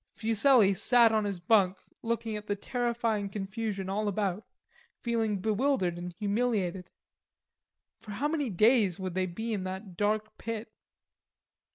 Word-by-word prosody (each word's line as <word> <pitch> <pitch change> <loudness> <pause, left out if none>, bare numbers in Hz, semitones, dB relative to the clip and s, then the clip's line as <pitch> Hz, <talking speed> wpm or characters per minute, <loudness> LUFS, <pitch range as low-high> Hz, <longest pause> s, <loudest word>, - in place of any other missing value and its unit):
Fuselli 225 -1 +4
sat 230 +4 +5
on 215 -1 +1
his 200 -3 -3
bunk 190 0 +3 0.2
looking 230 -1 -2
at 210 0 -7
the 205 - 0
terrifying 230 -2 -1
confusion 195 0 -4
all 205 +2 -1
about, 205 0 -2 0.5
feeling 225 -3 0
bewildered 215 -2 0
and 175 +1 -6
humiliated. 200 -3 -1 1.1
For 215 - -15
how 275 +9 -1
many 300 -4 -1
days 210 -1 +3
would 185 -2 -4
they 185 0 0
be 220 +6 -4
in 200 -3 -2
that 190 0 -6
dark 215 +1 -1
pit? 225 -1 -5
210 Hz, 140 wpm, -29 LUFS, 190-230 Hz, 1.1 s, sat